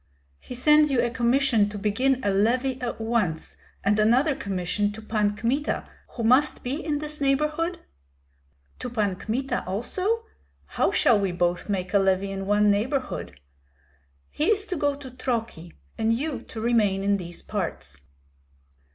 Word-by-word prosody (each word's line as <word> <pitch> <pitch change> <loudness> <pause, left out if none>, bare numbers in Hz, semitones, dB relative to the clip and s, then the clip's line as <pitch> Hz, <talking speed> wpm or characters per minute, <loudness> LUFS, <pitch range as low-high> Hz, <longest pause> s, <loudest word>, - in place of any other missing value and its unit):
He 250 - -8
sends 300 +4 +5
you 265 -3 +1
a 240 0 +1
commission 240 -3 +2
to 205 - -6
begin 250 +6 +1
a 200 - +2
levy 250 +6 +1
at 245 -2 -3
once, 220 -8 -1 0.3
and 205 +2 +2
another 255 +7 +3
commission 200 +1 -1
to 220 - -9
Pan 210 -2 0
Kmita, 265 +7 -1 0.3
who 235 - -3
must 255 +6 +3
be 275 +7 -3
in 300 -2 -1
this 300 0 -5
neighborhood." 300 +5 0 1.0
"To - - -4
Pan 210 -5 0
Kmita 250 +8 -2
also? 370 - -1 0.4
How - - 0
shall 225 -4 +4
we 195 -2 0
both 175 +2 -1
make 185 -2 -2
a 200 - +5
levy 195 0 +1
in 195 0 -5
one 205 0 +4
neighborhood?" 225 - -2 0.9
"He 300 - -1
is 415 +1 +2
to 370 - -3
go 290 -2 0
to 275 -2 -10
Troki, 225 -9 -4 0.3
and 225 0 +2
you 275 +5 -2
to 225 - -7
remain 215 -4 +2
in 200 0 +2
these 175 -2 -7
parts." 165 - -4
230 Hz, 160 wpm, -25 LUFS, 200-275 Hz, 1.0 s, sends